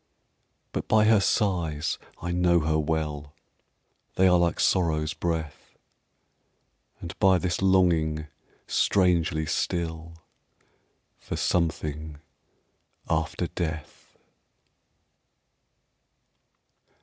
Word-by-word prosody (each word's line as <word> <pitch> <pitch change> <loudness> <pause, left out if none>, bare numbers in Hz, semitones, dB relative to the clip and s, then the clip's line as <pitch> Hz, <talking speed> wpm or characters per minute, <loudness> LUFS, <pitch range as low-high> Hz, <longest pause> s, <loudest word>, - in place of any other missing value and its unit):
But - - -4
by 110 -1 +4
her 110 -1 +5
sighs 90 -8 0 0.2
I 85 - -4
know 85 -1 +3
her 80 0 +1
well 75 -2 -3 0.8
They 95 - +4
are 90 -1 +4
like 85 -1 0
Sorrow's 80 -4 +1
breath; 80 -3 -4 1.2
And 85 - -7
by 95 -1 +5
this 90 +1 -2
longing, 85 -5 +2 0.4
strangely 85 -5 +1
still, 80 0 -3 1.1
For - - -6
something 80 -3 -2 0.9
after 80 +2 -1
death. 80 -3 -6
85 Hz, 80 wpm, -26 LUFS, 80-90 Hz, 1.2 s, her